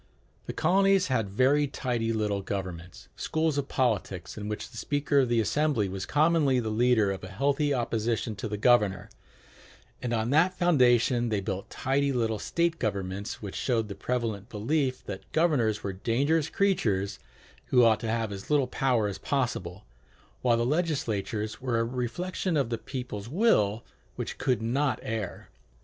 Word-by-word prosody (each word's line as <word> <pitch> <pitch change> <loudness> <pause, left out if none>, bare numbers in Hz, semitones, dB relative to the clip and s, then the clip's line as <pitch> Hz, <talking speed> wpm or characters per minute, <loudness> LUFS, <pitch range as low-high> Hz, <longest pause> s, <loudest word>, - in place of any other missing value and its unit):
The - - -3
colonies 195 +1 +3
had 115 -6 0
very 135 +8 +3
tidy 120 -4 -2
little 105 -3 -1
governments, 90 -3 -6
schools 160 -2 0
of 140 - -3
politics, 100 -10 -1
in 105 -1 -5
which 105 +2 -5
the 115 - -11
speaker 145 +3 +1
of 130 -3 +2
the 120 -1 +2
assembly 140 -1 +1
was 95 0 -5
commonly 150 -3 +3
the 110 -2 -2
leader 110 -2 +3
of 95 - -6
a - - -6
healthy 140 +9 0
opposition 115 -3 -1
to 100 - -4
the 105 0 -3
governor; 105 -4 +2 0.9
and 125 - -3
on 115 +1 0
that 175 +5 +3
foundation 125 -8 +3
they 105 -2 0
built 95 0 -4
tidy 140 +2 0
little 115 -4 0
state 170 -1 0
governments, 100 -1 -3
which 100 - -5
showed 115 -4 0
the - - -4
prevalent 110 0 -3
belief 130 +4 -1
that 95 -2 -8
governors 130 -11 +2
were 100 - -3
dangerous 140 - +1
creatures 105 - 0 0.5
who 125 -1 +5
ought 110 -2 +4
to 115 - -4
have 115 -1 -1
as 100 -1 -8
little 145 -3 +3
power 125 -3 +1
as 100 - -5
possible; 105 -9 -2 0.6
while 120 -2 +3
legislatures 115 - -1
were 125 -2 0
a - - +2
reflection 140 +9 -2
of 130 -4 0
the 115 - -1
people's 125 -5 -6
will 120 - +2 0.3
which - - -5
could 125 -3 0
not 130 +2 +1
err. 110 -4 -4
120 Hz, 165 wpm, -28 LUFS, 105-140 Hz, 0.9 s, who